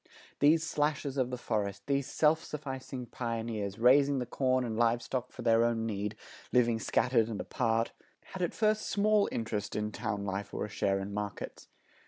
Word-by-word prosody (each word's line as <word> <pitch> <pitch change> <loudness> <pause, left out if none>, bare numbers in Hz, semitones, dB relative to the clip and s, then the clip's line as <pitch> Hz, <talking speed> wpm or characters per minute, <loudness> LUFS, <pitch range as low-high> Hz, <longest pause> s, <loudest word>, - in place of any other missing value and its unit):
These 155 +3 +5
slashers 145 -3 -1
of 130 -3 +1
the 125 - -3
forest, 100 -4 -2
these 140 -1 0
self 160 +1 +3
sufficing 130 -3 -6
pioneers, 115 -4 -3
raising 135 +4 +5
the 125 - -1
corn 130 +1 +1
and 115 -2 -3
live 120 +1 +3
stock 125 +1 -3
for - - -8
their 115 0 +4
own 115 -1 +1
need, 105 -1 -2 0.4
living 120 -2 +3
scattered 120 -1 +2
and 110 - -4
apart, 115 -2 0 0.4
had 190 - -5
at 175 - -1
first 215 -1 +1
small 210 0 +3
interest 110 -3 -3
in 105 0 -1
town 105 -3 -3
life 100 +1 -4
or - - -1
a - - -8
share 100 -1 0
in 100 +1 -5
markets. 105 0 -5
120 Hz, 180 wpm, -31 LUFS, 110-140 Hz, 0.4 s, These